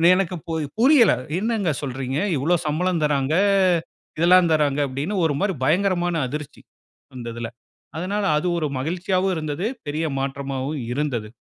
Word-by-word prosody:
எனக்கு 185 -1 -1
போய் 160 -2 -1
புரியலை, 255 -4 +6 0.2
"என்னாங்க 215 -6 0
சொல்றீங்க? 135 0 -3 0.2
இவ்ளோ 160 +7 +2
சம்பளம் 165 +2 0
தர்றாங்க, 145 -1 +1 0.9
இதெல்லாம் 175 0 +5
தராங்க!" 145 -2 +2
அப்டின்னு, 160 +9 -2
ஒரு 145 -3 +1
மாரி 195 -2 0
பயங்கரமான 175 -1 +1
அதிர்ச்சி 150 0 -7 0.5
அந்த 120 -2 -7
இதுல. 115 -1 -4 0.5
அதனால 200 +5 -2
அது 165 - -1
ஒரு 155 -2 0
மகிழ்ச்சியாவும் 185 +5 0
இருந்தது. 155 +6 -2 0.2
பெரிய 155 +3 -1
மாற்றமாவும் 135 +1 -3
இருந்தது 125 -7 -2
155 Hz, 130 wpm, -23 LUFS, 140-185 Hz, 0.9 s, புரியலை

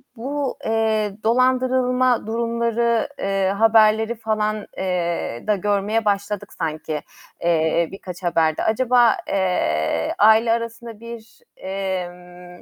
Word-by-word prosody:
bu, 270 +3 -3
eee, 220 -2 0
dolandırılma 255 0 +2
durumları, 235 0 0
eee, 195 -1 0
haberleri 220 +1 +4
falan, 215 -1 -2
eee, 175 -9 -2
da 210 - +3
görmeye 205 +3 0
başladık 200 0 -2
sanki, 155 -2 -4 0.4
eee, 165 0 +1
birkaç 185 -1 -9
haberde. 165 -2 +1
Acaba, 240 0 +3
eee, 85 - 0
aile 220 +2 +5
arasında 230 -1 -4
bir, 230 -1 -11 0.2
emm, 180 -2 -6
215 Hz, 100 wpm, -21 LUFS, 180-230 Hz, 0.4 s, aile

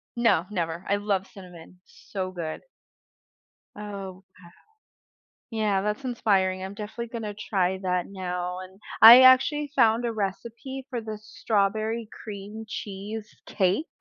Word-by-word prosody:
No, 230 -8 +3
never, 170 -1 -3
I 200 - +2
love 200 -2 -1
cinnamon. 180 -2 -14
So 185 -2 -6
good. 165 -3 -6 1.1
Oh, 200 -3 -7 0.2
okay. 180 - -18 1.1
Yeah, 215 -4 0
that's 210 +6 -2
inspiring, 195 -6 +1
I'm 190 +1 -6
definitely 220 +3 -6
gonna 220 -3 -5
try 190 -3 -1
that 180 -1 0
now 180 -2 -4
and 190 +1 -12 0.2
I 240 +3 +11
actually 280 +3 +5
found 230 -1 +3
a 235 - -1
recipe 230 +6 -5
for 245 - -3
the 220 -1 -6
strawberry 215 +1 -1 0.2
cream 210 +1 -8
cheese 210 +2 -6
cake. 195 - 0
205 Hz, 130 wpm, -26 LUFS, 185-225 Hz, 1.1 s, I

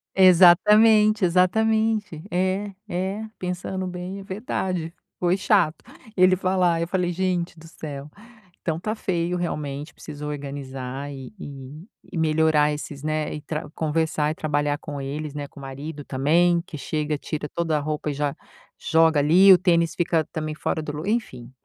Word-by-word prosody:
Exatamente, 210 +4 +6
exatamente. 210 0 +1
É, 190 +3 0 0.2
é, 190 +4 -3
pensando 185 +1 -4
bem, 180 +2 -6
é - - -9
verdade, 185 -4 -3 0.3
foi 180 +1 +2
chato 195 -5 +2 0.3
ele 185 0 +5
falar, 180 -2 +1
eu 170 - -1
falei: 180 0 0
"Gente 175 -1 -1
do 165 +1 -13
céu." 145 -3 -8 0.5
Então, 160 -2 -1
tá 215 +5 -2
feio 175 -3 -1
realmente, 150 -3 -4
preciso 150 -1 -8
organizar 140 -1 -6
e 135 +2 -9
e 140 +3 -9 0.2
e 180 - -5
melhorar 155 -1 +3
esses, 145 -1 -6
né, 155 0 -1
e 150 - -6
tra 150 0 -5
conversar 155 -1 0
e - - -5
trabalhar 145 -2 0
com 145 -1 -7
eles, 145 +2 -5
né, 145 -1 -4
com 140 - -15
o - - -10
marido 145 +3 -7
também, 170 +6 +2
que 155 - -8
chega, 150 +1 -2
tira 150 +1 -4
toda 165 -2 0
a - - 0
roupa 150 0 -3
e - - -2
já 145 0 -1 0.5
joga 160 -1 +3
ali, 175 +7 +6
o 185 - +9
tênis 170 -2 +2
fica 170 -2 +1
também 155 -2 -4
fora 160 - -2
do 150 -1 -5
lu 155 +3 -5
enfim, 130 - -2
160 Hz, 165 wpm, -24 LUFS, 150-185 Hz, 0.5 s, o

